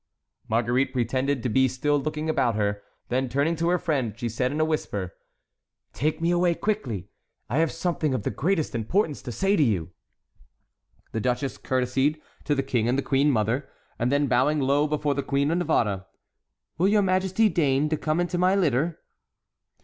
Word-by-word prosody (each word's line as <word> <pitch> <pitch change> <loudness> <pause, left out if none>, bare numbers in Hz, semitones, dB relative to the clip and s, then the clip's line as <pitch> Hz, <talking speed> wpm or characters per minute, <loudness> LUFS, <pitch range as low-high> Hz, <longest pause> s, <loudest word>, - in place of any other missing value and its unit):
Marguerite 120 +4 +1
pretended 130 +1 0
to - - 0
be 130 +4 +3
still 145 +4 0
looking 155 +2 -3
about 125 -7 +1
her; 105 -1 -1 0.3
then, 130 +1 0
turning 140 +6 +1
to 165 +2 +1
her 180 - +3
friend, 135 - -1
she 120 -1 -3
said 125 +3 -1
in 150 - -3
a 155 - +3
whisper: 100 - -3 0.8
"Take 155 +4 -1
me 165 +1 +1
away 175 -1 +2
quickly; 130 - -2 0.4
I 125 +7 0
have 165 -1 +2
something 165 -4 -1
of 110 - -3
the - - -1
greatest 165 -2 0
importance 145 - 0
to 125 - -6
say 195 - +1
to 170 - +2
you." 95 - +1 1.2
The 110 - -2
duchess 125 +3 -1
courtesied 130 +4 0 0.3
to 145 - +1
the 135 - 0
King 120 -4 0
and 130 +2 0
queen 140 +1 +3
mother, 120 +2 0 0.3
and 120 +2 +1
then, 145 +1 +2
bowing 135 +4 +2
low 140 +2 +2
before 150 -1 0
the 140 - -1
Queen 140 +2 0
of 170 - +1
Navarre: 100 - 0 0.7
"Will 185 - +4
your 205 0 +4
majesty 190 +3 +2
deign 150 -6 +2
to 155 - +1
come 155 +2 -1
into 175 0 -1
my 185 +2 +3
litter?" 160 -3 0
140 Hz, 180 wpm, -25 LUFS, 125-160 Hz, 1.2 s, Will